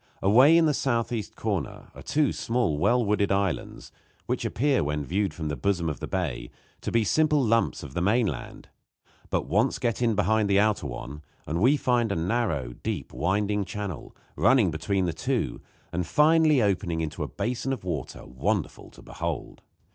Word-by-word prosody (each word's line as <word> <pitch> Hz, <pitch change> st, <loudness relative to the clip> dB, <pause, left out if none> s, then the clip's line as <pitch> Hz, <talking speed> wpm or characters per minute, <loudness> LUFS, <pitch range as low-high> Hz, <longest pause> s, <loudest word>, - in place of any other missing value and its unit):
Away 130 Hz, +11 st, +6 dB
in 165 Hz, -, +5 dB
the 150 Hz, -, +3 dB
southeast 120 Hz, -5 st, -1 dB
corner -, -, -4 dB
are -, -, -11 dB
two 145 Hz, -2 st, +1 dB
small 115 Hz, -11 st, -1 dB
well 120 Hz, +7 st, +3 dB
wooded 100 Hz, -1 st, +1 dB
islands, 100 Hz, -2 st, -2 dB, 0.3 s
which -, -, -2 dB
appear, 140 Hz, -, +1 dB
when 75 Hz, 0 st, -2 dB
viewed 95 Hz, +5 st, 0 dB
from 80 Hz, 0 st, -5 dB
the 75 Hz, -, -2 dB
bosom 85 Hz, +3 st, 0 dB
of 70 Hz, -5 st, -5 dB
the -, -, -5 dB
bay, -, -, -3 dB, 0.3 s
to -, -, -3 dB
be 115 Hz, -1 st, +3 dB
simple 150 Hz, +7 st, +2 dB
lumps 115 Hz, -3 st, +1 dB
of 70 Hz, -2 st, -9 dB
the 85 Hz, -, -2 dB
mainland; 100 Hz, -, -1 dB, 0.6 s
but -, -, 0 dB
once 105 Hz, +8 st, +1 dB
get 120 Hz, -3 st, -1 dB
in 115 Hz, -3 st, +2 dB
behind 105 Hz, +1 st, +2 dB
the 100 Hz, 0 st, +4 dB
outer 105 Hz, -7 st, +1 dB
one 65 Hz, +3 st, -7 dB, 0.2 s
and 85 Hz, +4 st, -2 dB
we 135 Hz, +7 st, +5 dB
find 120 Hz, -5 st, +1 dB
a -, -, 0 dB
narrow, 80 Hz, -, -1 dB
deep, -, -, -4 dB
winding 105 Hz, +3 st, 0 dB
channel 100 Hz, -5 st, -6 dB, 0.2 s
running 115 Hz, -10 st, +4 dB
between 95 Hz, +5 st, -1 dB
the 85 Hz, -, -1 dB
two, -, -, -2 dB, 0.3 s
and 90 Hz, -1 st, -2 dB
finally 155 Hz, -, +4 dB
opening 90 Hz, -5 st, 0 dB
into 80 Hz, +1 st, -4 dB
a 75 Hz, -, -1 dB
basin 120 Hz, -, -3 dB
of 130 Hz, -7 st, -4 dB
water 80 Hz, -8 st, -5 dB
wonderful 65 Hz, +1 st, -3 dB
to -, -, -16 dB
behold. -, -, -5 dB
100 Hz, 180 wpm, -26 LUFS, 80-120 Hz, 0.6 s, Away